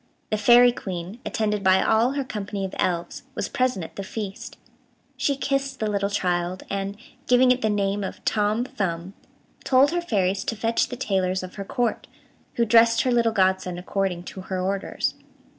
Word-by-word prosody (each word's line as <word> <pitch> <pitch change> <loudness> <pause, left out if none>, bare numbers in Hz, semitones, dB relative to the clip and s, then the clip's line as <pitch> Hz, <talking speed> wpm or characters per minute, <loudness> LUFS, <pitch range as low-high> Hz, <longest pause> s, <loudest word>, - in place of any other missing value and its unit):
The 215 - +2
Fairy 240 +3 +7
Queen, 185 -1 -6
attended 210 -2 -1
by 190 0 +5
all 230 +4 +3
her 280 -1 -1
company 205 -5 -4
of 190 - -7
elves, 170 -1 -1
was - - -2
present 255 -9 0
at - - -13
the 200 - -3
feast. 200 -1 -6 0.6
She 280 - 0
kissed 275 0 -2
the 220 - 0
little 200 -1 0
child, 180 -2 -1
and, 200 0 -3 0.3
giving 250 0 +5
it 250 0 +1
the 220 - +1
name 200 -1 0
of 190 - -7
Tom 215 +3 +1
Thumb, 185 -5 -3 0.5
told 270 +2 +4
her 350 0 0
fairies 195 - 0
to 225 - -2
fetch 225 +1 +1
the 245 - -6
tailors 190 -7 0
of 185 - -8
her 200 - -6
Court, 240 +2 -1 0.5
who 235 - +2
dressed 230 0 +5
her 255 - +1
little 235 -1 +3
godson 190 -3 +1
according 180 -1 -2
to 190 - -8
her 185 0 -4
orders. 190 +1 -1
205 Hz, 180 wpm, -24 LUFS, 190-235 Hz, 0.6 s, Fairy